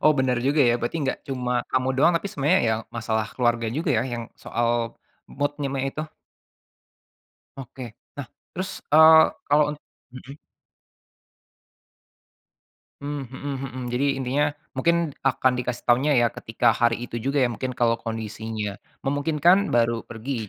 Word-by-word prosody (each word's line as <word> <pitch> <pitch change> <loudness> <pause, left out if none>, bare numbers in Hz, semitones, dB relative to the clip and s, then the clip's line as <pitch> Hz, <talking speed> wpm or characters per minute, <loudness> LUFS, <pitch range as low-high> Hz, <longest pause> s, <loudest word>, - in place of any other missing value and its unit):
Oh 155 - +6
bener 130 -1 +2
juga 145 +2 +3
ya, - - +4
berarti 120 +7 -2
gak - - -6
cuma 125 -2 -2 0.2
kamu 130 0 +1
doang, 155 +6 +5
tapi 170 - -3
sebenarnya 150 +7 +2
ya 110 - +2 0.2
masalah 110 -2 -1
keluarga 120 -2 +1
juga 160 0 -1
ya - - +1
yang 120 - -3 0.2
soal 120 0 -1 0.7
mood-nya 145 0 -1
me 135 - -1
itu. 155 +3 -5 1.5
Oke, 130 -3 -9 0.2
nah 140 -2 -5 0.3
terus, 185 +1 -4 0.2
eee, 160 +1 +9 0.3
kalau 150 +1 +5
unt 150 - -11 0.3
mhm? 130 +2 -10 2.6
Mmm, 140 -2 -5
mhm 135 +3 -6 0.2
mhm. 130 +1 -7
Jadi 125 +3 0
intinya 135 +2 0 0.3
mungkin 170 +6 +3 0.2
akan 130 -1 +2
dikasih 125 -1 -4
taunya 130 +4 +3
ya 120 - +4
ketika 110 - +1
hari 120 0 +3
itu 120 -1 -5
juga 140 +2 -1
ya, - - +2
mungkin 130 +2 -4
kalau 115 -1 +1
kondisinya 110 -2 -5 0.2
memungkinkan, 160 +7 +3
baru 115 -1 +2
pergi, 115 -1 -5
130 Hz, 145 wpm, -24 LUFS, 120-145 Hz, 2.6 s, eee